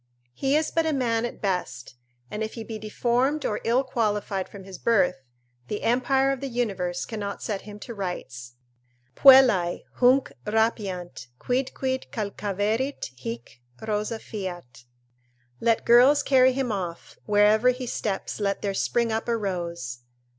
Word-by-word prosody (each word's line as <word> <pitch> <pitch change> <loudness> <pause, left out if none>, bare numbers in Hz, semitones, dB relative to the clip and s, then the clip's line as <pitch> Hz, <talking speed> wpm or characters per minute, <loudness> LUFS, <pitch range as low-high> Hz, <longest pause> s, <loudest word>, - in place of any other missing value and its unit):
He 270 - 0
is 310 - -1
but 325 -1 +1
a 315 - +1
man 235 -4 0
at 240 - -7
best, 180 -12 -2 0.4
and 210 - -4
if 220 0 -3
he 230 - -6
be 220 0 -7
deformed 245 +7 0
or 210 - -1
ill 245 +4 +2
qualified 210 -6 -1
from 200 -2 -11
his 190 -1 -10
birth, 190 -9 +2 0.5
the 210 - -4
empire 265 +3 +2
of 270 - -2
the 275 - -4
universe 195 -8 -2
cannot 205 -3 -5
set 205 -3 -3
him 205 - -9
to 235 - -7
rights: 130 - -6 0.6
"Puellae 255 -11 +6
Hunc 255 +2 +4 0.2
rapiant; 200 - -1
quidquid 260 +1 -2
calcaverit 210 - -2
hic, 120 0 -8 0.3
rosa 215 +1 -1
fiat," 175 - -7 0.7
["Let 230 -1 +1
girls 260 +5 +6
carry 260 -2 +5
him 260 -2 -1
off; 180 -4 -5
wherever 210 +3 +4
he 250 0 -2
steps 210 -4 -3
let 200 -1 -1
there 200 -1 -1
spring 235 +4 0
up 220 +1 -2
a 235 -1 +1
rose!" 170 - -4
215 Hz, 145 wpm, -25 LUFS, 190-250 Hz, 0.7 s, Puellae